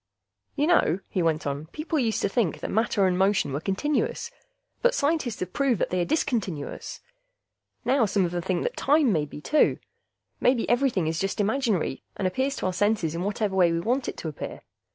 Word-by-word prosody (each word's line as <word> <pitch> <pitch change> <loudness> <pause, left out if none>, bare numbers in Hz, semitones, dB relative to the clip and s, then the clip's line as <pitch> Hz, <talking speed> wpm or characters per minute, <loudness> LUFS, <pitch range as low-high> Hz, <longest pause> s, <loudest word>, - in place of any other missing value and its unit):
"You 290 - +1
know," 315 - +3
he 185 - -1
went 160 -2 0
on, 145 +2 -3
"people 310 - -2
used 225 -4 0
to - - +3
think 200 -4 -1
matter 215 -2 +1
and 185 -1 +2
motion 190 -6 +2
were 140 - -1
continuous, 295 - -1 0.5
but - - +3
scientists 285 - 0
have 185 0 -4
proved 270 -7 +1
that - - -1
they 180 0 +1
are - - +1
discontinuous. 210 - -2 0.8
Now 260 -4 +3
some 195 -1 +2
of 170 - -3
them 175 0 -2
think 175 0 -1
time 285 -5 +3
may 155 -3 +1
be, 150 0 -10
too. 300 - +3 0.6
Maybe 250 -2 +2
everything 240 -7 +2
is 160 0 -1
just 195 +2 -2
imaginary, 210 - 0 0.2
and 190 - 0
appears 265 +9 -1
to - - -4
our 185 - 0
senses 200 -4 +1
in 170 - -3
whatever 205 0 -1
way 180 -3 +4
we 165 - 0
want 245 +8 0
it - - -7
to - - -5
appear. 155 - -6
200 Hz, 195 wpm, -26 LUFS, 175-265 Hz, 0.8 s, way